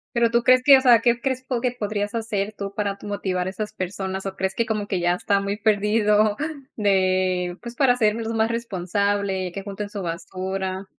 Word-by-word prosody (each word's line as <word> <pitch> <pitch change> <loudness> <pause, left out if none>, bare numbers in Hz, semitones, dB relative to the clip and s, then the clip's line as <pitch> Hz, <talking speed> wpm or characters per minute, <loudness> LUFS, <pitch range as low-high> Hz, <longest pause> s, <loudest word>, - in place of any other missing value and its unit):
Pero 235 -1 +3
tú 235 +1 +1
crees 255 +1 +5
que, 275 0 +8
o - - +1
sea, 245 -3 +6
¿qué 240 +1 +1
crees 260 0 -2
tú 245 -3 -1
que 250 0 +1
podrías 210 -2 -3
hacer 215 -3 -2
tú 200 -1 -6
para 200 -1 -2
tú 205 - -10
motivar 190 -3 -2
a - - -1
esas 210 +2 -5
personas? 190 +1 -4
¿O 195 -1 -4
crees 190 0 -2
que 230 - +1
como 215 -3 -2
que 190 - -1
ya 175 0 +2
está 200 +2 +1
muy 200 0 -2
perdido 210 0 +2 0.4
de, 185 -3 +1
pues, 235 0 -8
para 265 -2 +4
hacérmelos 225 -1 0
más 225 0 +1
responsable 200 -3 -1
y - - -7
que 195 - -6
junten 205 +1 -6
su 205 -1 -6
basura? 185 +2 -4
205 Hz, 215 wpm, -23 LUFS, 190-230 Hz, 0.4 s, que